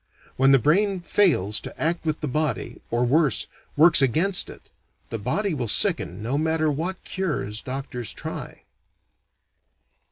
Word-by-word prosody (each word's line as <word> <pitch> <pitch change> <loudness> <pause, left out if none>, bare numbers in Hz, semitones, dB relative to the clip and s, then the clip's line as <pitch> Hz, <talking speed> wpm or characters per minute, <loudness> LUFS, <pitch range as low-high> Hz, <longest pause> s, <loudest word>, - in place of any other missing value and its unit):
When 135 +1 +4
the 135 - +7
brain 185 - +1
fails 140 - +2
to - - -10
act 165 +1 0
with 155 0 -2
the 150 - -2
body, 150 -2 -2
or, 120 +1 0
worse, 150 +4 +2 0.3
works 165 0 +7
against 165 - +2
it, - - -14 0.4
the 115 - -3
body 200 - -1
will 125 -6 -3
sicken 105 - +2
no 130 +6 -1
matter 160 -1 +1
what 175 +6 -4
cures 150 - -3
doctors 130 -3 -5
try. - - -8
150 Hz, 140 wpm, -24 LUFS, 125-170 Hz, 0.4 s, the